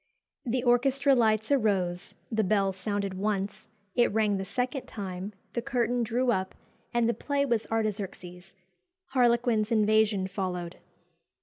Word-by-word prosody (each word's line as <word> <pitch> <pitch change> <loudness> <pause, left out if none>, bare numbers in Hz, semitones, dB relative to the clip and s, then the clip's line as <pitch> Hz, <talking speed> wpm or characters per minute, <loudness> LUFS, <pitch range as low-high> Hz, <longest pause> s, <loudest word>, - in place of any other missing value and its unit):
The 240 +1 0
orchestra 270 +3 +3
lights 220 -1 +2
arose 195 -8 0 0.2
the 220 -1 +1
bell 195 -1 +2
sounded 200 0 -3
once 200 0 -2 0.3
it 240 - +3
rang 210 -1 +2
the 190 - -3
second 250 +5 -2
time 195 -1 -5 0.2
the 235 - -1
curtain 245 0 0
drew 240 +2 +1
up, 190 -4 -2 0.4
and 235 -1 +2
the 235 - +2
play 280 +2 -1
was 235 -5 0
'Artaxerxes;' 195 -4 -4 0.5
'Harlequin's 235 -4 +2
Invasion' 215 -2 +3
followed." 185 -3 -4
215 Hz, 130 wpm, -28 LUFS, 195-240 Hz, 0.5 s, orchestra